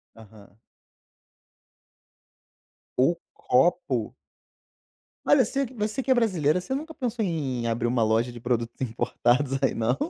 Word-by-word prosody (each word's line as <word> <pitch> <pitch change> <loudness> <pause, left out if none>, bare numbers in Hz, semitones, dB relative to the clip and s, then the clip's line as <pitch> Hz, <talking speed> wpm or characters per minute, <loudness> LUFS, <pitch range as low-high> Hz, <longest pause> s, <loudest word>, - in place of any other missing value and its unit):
Aham. 105 -2 -16 2.4
O - - +3 0.2
copo? - - +1 1.1
Mas - - +5
você 275 0 0
você 225 +1 -3
que 265 - -8
é - - +7
brasileira, 180 - +2
você 225 +9 -5
nunca 310 +4 -4
pensou 240 -6 -2
em 135 - -2
abrir 115 +1 0
uma 120 -1 +1
loja 110 +3 +1
de 120 - -10
produtos 120 -1 -2
importados 125 +2 0
aí - - +2
não? 115 +2 +1
130 Hz, 125 wpm, -26 LUFS, -, 2.4 s, é